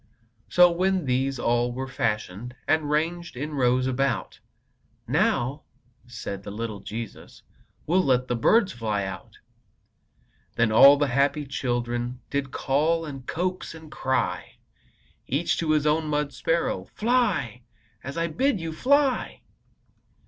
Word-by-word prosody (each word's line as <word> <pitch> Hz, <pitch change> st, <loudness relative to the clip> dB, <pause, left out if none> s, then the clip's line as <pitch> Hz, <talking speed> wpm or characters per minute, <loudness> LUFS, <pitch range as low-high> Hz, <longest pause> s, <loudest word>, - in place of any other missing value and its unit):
So, 180 Hz, 0 st, +6 dB
when 185 Hz, 0 st, 0 dB
these 130 Hz, +1 st, 0 dB
all 120 Hz, 0 st, +1 dB
were 130 Hz, +2 st, -4 dB
fashioned, 115 Hz, -1 st, -3 dB
And 155 Hz, -2 st, +1 dB
ranged 165 Hz, 0 st, -1 dB
in 150 Hz, +4 st, -4 dB
rows 130 Hz, -2 st, +2 dB
about, 135 Hz, +1 st, -1 dB, 0.7 s
"Now," 135 Hz, +5 st, +1 dB, 0.5 s
said 100 Hz, -5 st, -6 dB
the 100 Hz, -, -8 dB
little 105 Hz, 0 st, -5 dB
Jesus, 115 Hz, +1 st, -8 dB, 0.4 s
"We'll 180 Hz, +4 st, +3 dB
let 130 Hz, -3 st, +2 dB
the 120 Hz, -, 0 dB
birds 200 Hz, -, +3 dB
fly 110 Hz, -, -2 dB
out." 95 Hz, 0 st, -8 dB, 1.2 s
Then 115 Hz, -1 st, +2 dB
all 140 Hz, +6 st, +8 dB
the 145 Hz, -1 st, +1 dB
happy 140 Hz, +3 st, +1 dB
children 120 Hz, -2 st, -2 dB
Did 140 Hz, -1 st, -1 dB
call, 155 Hz, +6 st, 0 dB
and 135 Hz, -4 st, -8 dB
coax, 180 Hz, 0 st, -3 dB
and 160 Hz, -1 st, -12 dB
cry 130 Hz, -3 st, -2 dB, 0.7 s
Each 150 Hz, +6 st, 0 dB
to 165 Hz, -, -2 dB
his 155 Hz, -1 st, +2 dB
own 155 Hz, +1 st, +2 dB
mud 150 Hz, -1 st, -1 dB
sparrow: 165 Hz, +1 st, -1 dB
"Fly, 210 Hz, -, +1 dB, 0.4 s
as 140 Hz, +5 st, -6 dB
I 165 Hz, -, +1 dB
bid 230 Hz, -, 0 dB
you! 165 Hz, -1 st, -4 dB
Fly!" 275 Hz, -, +1 dB
140 Hz, 135 wpm, -25 LUFS, 120-165 Hz, 1.2 s, all